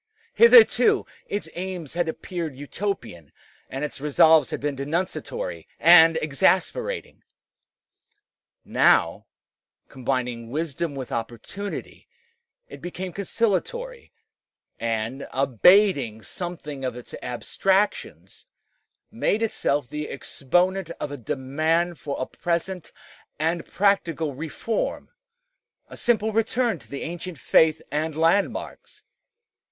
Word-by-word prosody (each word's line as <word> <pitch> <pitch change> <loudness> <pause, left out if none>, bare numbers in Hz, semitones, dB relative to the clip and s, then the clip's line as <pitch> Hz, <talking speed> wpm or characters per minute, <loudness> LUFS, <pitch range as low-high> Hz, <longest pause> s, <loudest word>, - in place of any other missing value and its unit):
Hitherto 465 0 +6 0.2
its 205 - -3
aims 180 -4 -5
had 170 -1 0
appeared 165 -3 -5
Utopian, 135 - -5 0.4
and 135 +2 -4
its 145 - -7
resolves 150 0 +5
had - - -4
been 145 0 -2
denunciatory 185 - -3
and 165 -1 +7
exasperating. 190 - 0 1.4
Now, - - +3 0.6
combining 125 -3 -3
wisdom 155 +2 -3
with 130 -2 -6
opportunity, 120 - -6 0.6
it - - -11
became 180 0 -6
conciliatory, 235 - -2 0.7
and, 115 +4 -3
abating 135 - +3
something 155 -6 -6
of 125 -2 -2
its 125 - -10
abstractions, 190 - -1 0.6
made 220 +2 0
itself 145 - 0
the 150 +3 -5
exponent 180 +6 0
of 145 - -4
a - - -4
demand 155 +7 -1
for 140 - -5
a 130 - -1
present 175 +2 -3 0.5
and 165 +2 -1
practical 165 -7 +1
reform 165 - -3 0.8
a - - -10
simple 220 -2 +1
return 225 -2 0
to - - -17
the 140 - -5
ancient 175 0 -6
faith 155 +5 +3
and 155 +1 -2
landmarks. 165 +5 0
165 Hz, 100 wpm, -24 LUFS, 140-190 Hz, 1.4 s, and